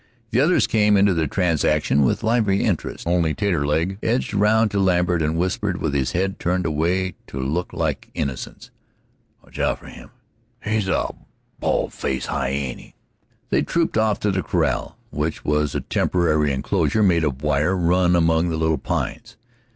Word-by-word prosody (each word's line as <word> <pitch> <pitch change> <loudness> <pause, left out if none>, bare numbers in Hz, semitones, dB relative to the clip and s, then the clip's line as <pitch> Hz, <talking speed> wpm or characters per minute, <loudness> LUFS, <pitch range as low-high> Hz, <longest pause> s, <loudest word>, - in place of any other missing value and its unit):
The 120 - +2
others 165 +6 +4
came 105 -2 +3
into 100 0 +4
the 80 -2 0
transaction 80 -4 +1
with 65 - +1
lively 110 -4 +2
interest. - - -2
Only 85 -2 +1
Taterleg 85 -1 0
edged 120 +1 -1
round 105 +1 +3
to 100 - 0
Lambert, 90 -2 +2
and 80 +1 0
whispered 90 +2 -1
with 75 -3 -2
his 65 -2 0
head 95 +2 -1
turned 90 +1 0
away 85 +4 0
to 65 - -7
look 75 +7 -2
like - - -3
innocence: 65 -2 -5 0.7
"Watch - - -13
out - - +1
for - - -17
him - - -12 0.6
he's 110 -2 0
a 95 - 0 0.5
bal' - - 0
faced 65 -1 -3
hyeeny!" 70 -2 -3 0.6
They - - +3
trooped 170 -1 0
off 110 -2 +2
to 105 - +1
the 95 -1 0
corral, - - -1
which 75 +1 -3
was 75 -1 0
a - - -1
temporary 75 -5 +1
enclosure 70 +10 0
made 85 -4 +3
of 70 -2 -2
wire 75 +5 +1
run 90 +1 +3
among 80 0 +2
the 80 - -2
little 80 -1 +1
pines. - - -4
90 Hz, 165 wpm, -22 LUFS, 75-100 Hz, 0.7 s, others